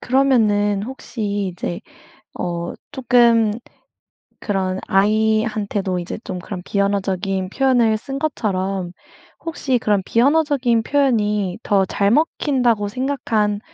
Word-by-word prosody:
그러면은 215 -6 +2
혹시 205 -6 -4
이제 175 0 -5 0.6
어 170 0 -3 0.2
쪼끔 235 -4 +3 0.9
그런 190 -2 -1
아이한테도 210 -2 +1
이제 175 - -5
좀 185 -1 -5
그런 180 0 -7
비언어적인 195 -1 -1
표현을 245 -3 +2
쓴 270 +4 -6
것처럼 195 - -2 0.5
혹시 290 -6 -1
그런 205 -3 +1
비언어적인 265 -3 +2
표현이 210 -9 +1
더 195 -2 +2
잘 200 +2 +1
먹힌다고 250 -7 +1
생각한 225 -4 -1
210 Hz, 245 characters per minute, -20 LUFS, 195-250 Hz, 0.9 s, 쪼끔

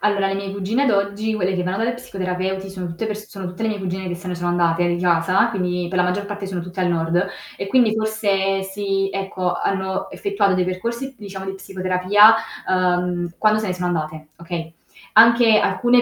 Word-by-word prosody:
Allora, 200 -2 +2
le 195 - -1
mie 195 0 -4
cugine 200 +7 0
ad 275 - +3
oggi, 200 +2 0
quelle 190 -2 0
che 180 - -1
vanno 185 +2 -2
dalla 230 +2 0
psicoterapeuti 190 -4 -3
sono 185 -2 -6
tutte 170 +6 -4
pers 210 0 -5
sono 195 -3 -6
tutte 180 +5 -6
le 225 - +1
mie 210 - -3
cugine 190 0 -4
che 175 - -3
se 180 +2 -10
ne 180 - -2
sono 175 0 -2
andate 175 0 +2
di 175 0 0
casa, 180 +5 +3
quindi, 180 -4 -2
per 185 - -2
la 180 - +4
maggior 180 +3 -1
parte 205 -1 -5
sono 185 -2 -4
tutte 180 +2 -5
al 180 - +2
nord 170 +1 +1 0.3
e 195 - -4
quindi 225 0 +3
forse 200 -3 0
si 195 0 -1
ecco 190 -2 -2
hanno 190 0 -2
effettuato 200 -1 +1
dei 185 -1 +1
percorsi, 235 +8 -4
diciamo, 195 -3 -8
di 190 - -4
psicoterapia, 195 +3 +4 0.3
uhm, 180 -1 +1
quando 215 0 +3
se 215 - -3
ne 185 - -1
sono 180 0 -2
andate 155 -2 -3
okay, 170 -1 -6 0.4
anche 230 -1 +7
alcune 245 +2 +3
190 Hz, 210 wpm, -21 LUFS, 180-205 Hz, 0.4 s, anche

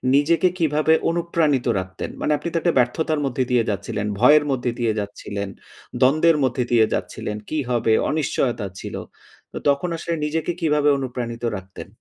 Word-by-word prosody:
নিজেকে 160 +5 +3
কিভাবে 155 0 +3 0.2
অনুপ্রাণিত 165 -5 +1
রাখতেন? 95 0 -6
মানে 150 - 0
আপনি - - -6
তো - - +1
একটা 170 - +2
ব্যর্থতার 150 +6 +1
মধ্যে 130 -1 0
দিয়ে 120 -2 +3
যাচ্ছিলেন, 100 +1 -3
ভয়ের 145 +5 +6
মধ্যে 125 -2 -1
দিয়ে 115 -2 +1
যাচ্ছিলেন, 100 0 -5 0.5
দ্বন্দ্বের 155 +5 +4
মধ্যে 125 -1 +1
দিয়ে 115 -2 +5
যাচ্ছিলেন 105 0 -4
কি 155 - -2
হবে 115 -2 +2 0.2
অনিশ্চয়তা 130 -7 -1
ছিল। - - -6 0.6
তো - - -7
তখন 140 +5 +1
আসলে 170 +1 -3
নিজেকে 160 +3 -1
কিভাবে 150 -2 +3
অনুপ্রাণিত 120 -3 -5
রাখতেন? 95 +1 -10
135 Hz, 155 wpm, -22 LUFS, 115-155 Hz, 0.6 s, ভয়ের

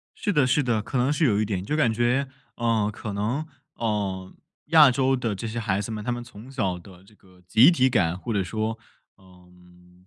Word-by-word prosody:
是 205 - -2
的 145 -7 +3
是 145 +3 +2
的， 115 -4 0
可 125 +4 -3
能 130 +4 +2
是 155 +1 +1
有 105 -6 +2
一 - - +2
点， 95 -3 -3
就 150 +9 -1
感 120 -7 +2
觉， 120 +4 +1 0.3
呃， 115 -3 +1
可 105 0 -6
能， 110 +9 -2 0.3
呃， 100 -5 -2 0.3
亚 155 -4 +7
洲 135 +1 +1
的 115 -4 -2
这 115 +4 -5
些 115 +2 -5
孩 100 -4 -1
子 105 - -5
们， 105 -1 -5
他 125 - -1
们 120 0 -4
从 120 +1 -13
小 100 -9 -2
的 90 0 -15
这 100 +3 -21
个 95 -3 -23
集 115 - +7
体 130 -6 +3
感， 90 -9 +1
或 115 +5 -5
者 100 -3 0
说， 110 +4 -3 0.4
嗯， 90 -1 -21
110 Hz, 235 characters per minute, -25 LUFS, 95-125 Hz, 0.4 s, 亚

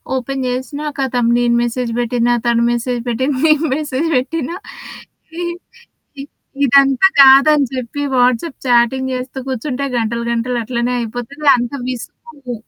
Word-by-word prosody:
Open 265 +1 -3
చేసినా 260 +4 -4
ఖతం 250 -3 0
నేను 240 -1 +2
మెసేజ్ 240 0 -2
పెట్టినా 240 0 +1
తను 235 0 +2
మెసేజ్ 240 0 -2
పెట్టిన 260 +4 -1
నేను 310 +1 +3
మెసేజ్ 300 0 -2
పెట్టినా 320 +5 -3 1.6
ఇ - - -5 0.4
ఇదంతా 275 +5 +5
కాదని 275 +2 +6
చెప్పి. 255 +2 -5 0.2
వాట్స్‌అప్ 250 +5 +1
చాటింగ్ 250 +2 +2
జేస్తూ 255 +1 -5
కూర్చుంటే 260 +2 -3
గంటలు 235 +1 -2
గంటలు 240 +1 -1
అట్లనే 240 +1 -2
అయిపోతది. 245 +6 -7
అంత 240 -1 -3 0.2
విసుకు 255 +2 -8
255 Hz, 125 wpm, -17 LUFS, 240-275 Hz, 1.6 s, కాదని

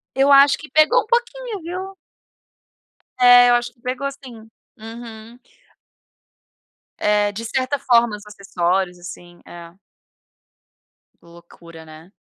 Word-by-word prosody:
Eu 275 +1 +3
acho 280 0 +6
que 305 - -13
pegou 310 0 +3
um - - -12
pouquinho, 480 -2 -3
viu. 370 +3 -7 1.2
É, 245 0 +7
eu 240 - +4
acho 240 0 -3
que 235 - -34
pegou 260 +2 -4
sim. 240 -5 -14 0.3
Uhum. 225 +1 -12 1.6
Eh, 210 0 +1
de 220 +3 -7
certa 260 +3 -2
forma, 240 -5 +2
os 210 0 -13
acessórios, 190 -3 -3
assim. 175 0 -12
É. 170 0 -13 1.5
Loucura, 170 -1 -16
né? 155 +3 -15
235 Hz, 115 wpm, -20 LUFS, 190-275 Hz, 1.6 s, É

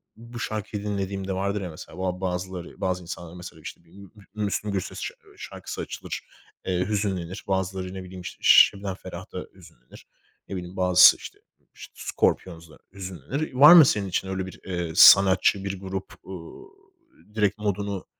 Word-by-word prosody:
bu 120 +1 -10
şarkıyı 105 -2 -4
dinlediğimde 100 -1 -3
vardır 100 +2 -2
ya 90 - -5
mesela 80 - -11
bu 95 0 -2
a 90 0 -4
bazıları, 90 -1 -5
bazı 90 -1 -1
insanlar 85 -1 -8
mesela 90 -2 -11
işte 80 - -10
bir 85 - -26
M 100 +2 -14
Mü 100 - -13 0.3
Müslüm 105 0 -2
Gürses 95 -2 -4
şa - - -5 0.2
şarkısı - - -7
açılır, - - -6 0.4
eee, 90 -1 -1
hüzünlenir. 95 -3 -3
Bazıları 95 -1 -2
ne 95 -1 -7
bileyim 90 0 -10
işte 85 - -9
Ş - - +8
Şebnem 100 -1 -6
Ferah'ta - - -9
hüzünlenir. - - -17 0.4
Ne 100 - -6
bileyim 90 0 -7
bazısı 90 -1 +7
işte - - -11
ı - - -43
ş - - -12
Scorpions'la 85 -3 -2 0.2
hüzünlenir. 95 - -5
Var 145 +6 +9
mı 165 -4 +10
senin 105 -6 0
için 95 +1 -2
öyle 95 0 -3
bir, 95 - -11
eee, 90 -3 -3
sanatçı, 95 0 +7
bir 100 -1 -4
grup, 95 0 -6
ııı, 95 - -10 0.7
direkt 105 -1 +1
modunu 100 -2 -3
95 Hz, 170 wpm, -25 LUFS, 90-100 Hz, 0.7 s, mı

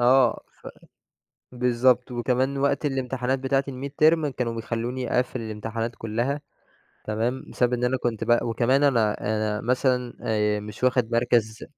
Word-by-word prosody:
آه، 125 -1 +4 0.2
ف - - -12 0.9
بالضبط، 125 0 +2
وكمان 130 +3 0
وقت 140 +2 +1
الامتحانات 130 -1 -1
بتاعة 135 +1 +1
الميدترم 150 +4 +2
كانوا 125 -4 -2
بيخلّوني 120 +2 -3
أقفّل 125 0 0
الامتحانات 115 +1 -4
كلّها. 120 +6 -2 0.6
تمام؟ 115 +4 -2
بسبب 125 0 +1
إن 125 0 0
أنا 125 +1 +1
كنت 115 -3 -1
ب 120 0 +4
وكمان 120 +4 +1
أنا 115 -7 +2
أنا 105 -1 -1
مثلًا 125 0 0
آآ، 105 -1 +1
مش 105 +4 -6
واخد 125 -2 +2
مَركَز 115 -2 +1
125 Hz, 140 wpm, -25 LUFS, 115-130 Hz, 0.9 s, آه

